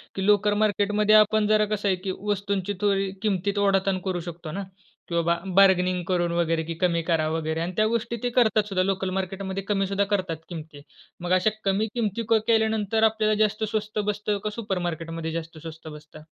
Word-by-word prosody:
की 190 - -2
लोकल 210 0 +4
मार्केटमध्ये 210 +1 +2
आपण 215 0 +4
जरा 215 0 +4
कसं 205 0 -3
आहे 190 - +3
की 190 - -2 0.2
वस्तूंची 200 0 -2
थोडी 195 -2 +1
किमतीत 200 -1 -1
ओढाताण 195 -1 +2
करू 185 -2 -1
शकतो 170 -2 -7
ना 195 +5 -4 0.4
किंवा 170 0 +1 0.2
बार्गेनिंग 185 -2 +4
करून 175 -2 +1
वगैरे 165 -1 +1
की 165 +1 -5
कमी 170 -1 +1
करा 160 -2 +2
वगैरे 160 0 -2
आणि 175 - -2
त्या 215 - +4
गोष्टी 235 +1 -2
ते 245 - +1
करतात 220 -3 +4
सुद्धा 185 -2 +1
लोकल 190 0 -1
मार्केटमध्ये 190 +1 -4
कमी 195 -1 0
सुद्धा 200 +1 +1
करतात 185 -5 -1
किमती. 155 -4 -8 0.4
मग 175 +1 -4
अशा 185 +3 +4 0.2
कमी 200 +3 +1
किमती 230 -1 -1
क 225 -1 +5
केल्यानंतर 220 -1 +2
आपल्याला 220 -1 +3
जास्त 215 +1 -1
स्वस्त 215 0 -2
बसतं? 210 0 -1
का 215 - -1
सुपरमार्केट 175 -7 -3
मध्ये 165 -1 -4
जास्त 165 0 -6
स्वस्त 160 0 -10
बसतं? 150 0 -11
195 Hz, 185 wpm, -25 LUFS, 175-210 Hz, 0.4 s, क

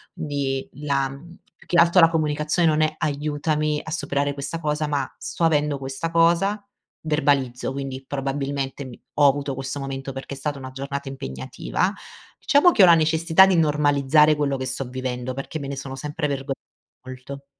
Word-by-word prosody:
quindi 140 -3 -2
la 140 -2 -1
mhmm 165 +6 -12 0.2
più - - -21
che 175 - +1
altro 170 +2 +4
la 165 -2 +7
comunicazione 155 +1 +1
non 155 0 +2
è 155 0 +1
“aiutami 150 0 -1
a 160 - -8
superare 145 -1 -1
questa 145 +4 -5
cosa” 150 -1 -1
ma 140 -3 -1
“sto - - -4
avendo 150 -3 +2
questa 135 +4 -4
cosa” 170 +5 +3 0.4
verbalizzo, 140 -5 0
quindi 135 -1 -5
probabilmente 135 0 -3
mi 125 - -11 0.2
ho 145 -1 +6
avuto 140 0 0
questo 135 +2 -4
momento 135 0 -5
perché 135 +1 -7
è - - -12
stata 145 0 -3
una 130 0 -8
giornata 140 +1 -5
impegnativa. 130 - -3 0.5
Diciamo 295 +5 +5
che 210 - +5
ho - - +11
la 170 - +8
necessità 160 +3 +5
di 190 - +3
normalizzare 150 -1 +4
quello 140 -2 0
che 130 - -4
sto 130 +1 -3
vivendo, 130 0 -4
perché 135 +4 -5
me 140 - -6
ne 140 - -5
sono 135 0 -6
sempre 150 +2 -3
vergo 140 -1 -4 0.5
molto. 130 +2 -9
145 Hz, 175 wpm, -23 LUFS, 135-155 Hz, 0.5 s, ho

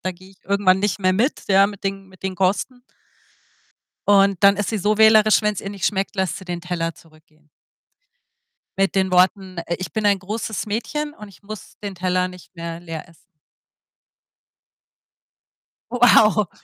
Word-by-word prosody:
da 185 - -2
gehe 185 +2 -17
ich 195 - -23
irgendwann 195 -1 +2
nicht 205 -1 0
mehr 185 -1 +2
mit, 245 +9 0
ja, 195 0 +5
mit 200 -1 -10
den 195 0 -4
mit 185 -1 -20
den 190 -1 -4
Kosten. 200 +7 -1 1.3
Und 200 -1 +4
dann 200 0 +6
ist 205 - -2
sie 220 - -2
so 210 +2 +1
wählerisch, 220 0 +5
wenn's 210 -2 -1
ihr 195 - -6
nicht 200 -2 -6
schmeckt, 195 0 -1
lässt 190 -4 -1
sie 190 - -13
den 175 -1 -5
Teller 170 -2 -3
zurückgehen 155 -1 -23 1.3
mit 195 0 +1
den 190 -1 +1
Worten, 185 0 +2
äh: 170 - -1
„Ich 185 - -5
bin 215 -2 -1
ein 200 -2 +3
großes 215 +2 -4
Mädchen 295 +8 -3
und 210 -7 -12
ich 200 - -19
muss 215 +1 -10
den 200 -2 -6
Teller 180 0 0
nicht 180 0 -15
mehr 170 -1 -6
leer 165 -2 -8
essen.“ 165 - -23 2.7
Wow. 220 -5 +4
195 Hz, 170 wpm, -21 LUFS, 180-210 Hz, 2.7 s, dann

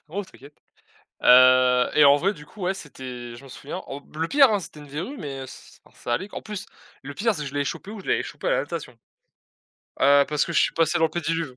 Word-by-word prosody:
non, 195 +6 -4
t'inquiète, 145 -5 -16 0.7
heu, 125 0 +6
et 150 - +5
en 140 0 +8
vrai, 190 +8 0
du 150 -5 -14
coup, 215 - -14
ouais, 185 +2 +1
c'était 125 -8 -9
je 120 - -13
m'en 135 - -13
souviens, 140 +6 -7
au 140 +1 -7
le 160 +1 -1
pire, 275 - +5
hein, 205 - +1
c'était 160 -4 -11
une 145 - -12
verrue, 165 - -6
mais 135 - -6
ç - - -14
alors - - -23
ça 120 - -3
allait. 190 +9 -4
En - - -5
plus, 210 -2 -7 0.4
le 145 +1 -7
pire, 220 +6 0
c'est 150 - -4
que - - -5
je - - -15
l'avais 145 0 0
chopé 195 - -5
où, 220 - -8
je - - -12
l'avais - - +1
chopé - - -7
à - - +2
la - - +2
natation, 165 -7 -6 1.1
heu, 140 +1 +6
parce 150 -1 +1
que 170 - -5
je 160 - +3
suis - - +2
passé 165 +1 +2
dans 165 - +3
le - - -9
pédiluve. 165 -4 -3
150 Hz, 260 wpm, -24 LUFS, 135-185 Hz, 1.1 s, en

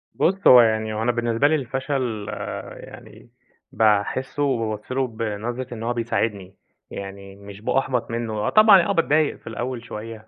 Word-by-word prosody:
بُص 195 +3 +1
هو 125 -1 +10
يعني 110 -1 +1
هو 110 - -3
أنا 120 - +2
بالنسبة 120 +3 +1
لي 155 - +2
الفشل 130 -5 -3 0.5
يعني - - -13 0.4
باحسه 110 +6 +1
وبابُص 115 -5 -2
له 130 0 0
بنظرة 115 +2 -5
إن 115 -1 -7
هو 120 +1 -1
بيساعدني، 105 -5 -2 0.4
يعني 100 0 -8
مش 100 0 -12
بأُحبط 125 -1 -1
منه. 115 -1 -3
آه 105 0 -1
طبعًا، 215 -4 +7
آه 170 - -1
باتضايق 155 -4 +2
في - - -21
الأول 120 +1 -4
شوية 110 0 -8
115 Hz, 160 wpm, -23 LUFS, 110-130 Hz, 0.5 s, هو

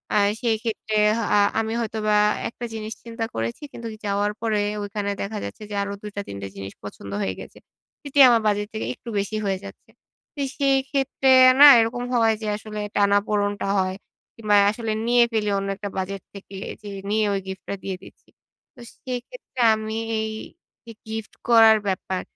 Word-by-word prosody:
আর 200 -1 +4
সেক্ষেত্রে 220 -2 -2 0.2
হ - - -1 0.2
আ - - +5 0.2
আমি 225 0 -2
হয়তোবা 215 -2 0
আ - - -1
একটা 235 +1 -7
জিনিস 220 0 -5
চিন্তা 230 -1 -4
করেছি 115 - -3
কিন্তু 230 -1 -7
যাওয়ার 205 +1 0
পরে 220 -2 +1 0.2
ঐখানে 205 0 -3
দেখা 210 +2 -4
যাচ্ছে - - -7
যে 205 - -5
আরো 200 0 -4
২ 210 - -7
টা 200 - -2
৩ 100 - -7
টা 100 - -5
জিনিস 100 0 -7
পছন্দ 100 -1 -9
হয়ে 95 -2 -1
গেছে। - - -11 0.5
এটি 285 0 -1
আমার 235 -2 +4
বাজেট 205 0 0
থেকে 220 - -3
একটু 240 - -11
বেশি 200 +2 -3
হয়ে 195 -1 0
যাচ্ছে। - - -12 0.5
তো 285 - -4 0.2
সেই 275 -2 +3
ক্ষেত্রে 270 -1 0 0.3
না - - +12
এরকম 230 +2 0
হয় 225 -2 +4
যে 215 - -4
আসলে 215 0 -7 0.2
টানা-পোড়নটা 205 0 +1
হয়। 185 0 -1 0.4
কিংবা 215 -2 +1 0.2
আসলে 225 0 -4 0.2
নিয়ে 240 0 +5
ফেলি 215 -2 0
অন্য 195 0 -2
একটা 205 0 -5
বাজেট 190 +1 -3
থেকে 200 0 -11 0.3
যে 210 - -8 0.2
নিয়ে 215 +1 +2
ঐ - - 0
গিফটটা 190 +1 -6
দিয়ে 195 - -3
দিচ্ছি। - - -17 0.5
তো - - -18 0.3
সেইক্ষেত্রে 255 - -7 0.2
আমি 220 0 -5 0.2
এই 220 0 -2 0.5
যে 230 - -9 0.2
গিফট 220 -1 -6 0.2
করার 225 -2 +7
ব্যাপার, 190 -1 -2
215 Hz, 180 wpm, -23 LUFS, 200-230 Hz, 0.5 s, না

